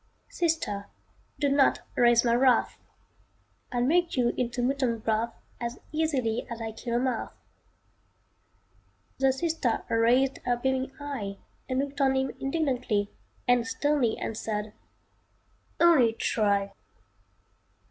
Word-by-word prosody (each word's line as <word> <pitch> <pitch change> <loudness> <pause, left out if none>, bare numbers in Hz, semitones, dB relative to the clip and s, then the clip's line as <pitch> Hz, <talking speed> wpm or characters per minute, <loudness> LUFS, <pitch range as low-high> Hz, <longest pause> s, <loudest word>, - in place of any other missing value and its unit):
"Sister, 315 - -1 0.5
do 290 - +1
not 280 0 +3
raise 240 0 +5
my 235 - +3
wrath. 250 0 +3 0.9
I'd 245 -2 0
make 345 +2 +2
you 240 -1 +3
into 245 0 -2
mutton 255 -2 +1
broth 225 +1 -1 0.2
As 235 0 -4
easily 275 -8 0
as 235 -1 -6 0.2
kill 235 +1 -3
a - - +3
moth" 255 -2 -1 1.9
The 270 0 +4
sister 270 -4 -1
raised 245 +4 +3
her 245 -1 0
beaming 265 +1 -1
eye 245 -9 -5 0.3
And 255 - -1
looked 280 +1 -2
on 265 -1 +3
him 265 0 0
indignantly 255 -8 -1 0.4
And 245 -2 +3
sternly 285 -4 +1
answered, 215 -1 -4 1.1
"Only 290 -10 +5
try!" 200 -3 0
245 Hz, 115 wpm, -28 LUFS, 230-275 Hz, 1.9 s, raise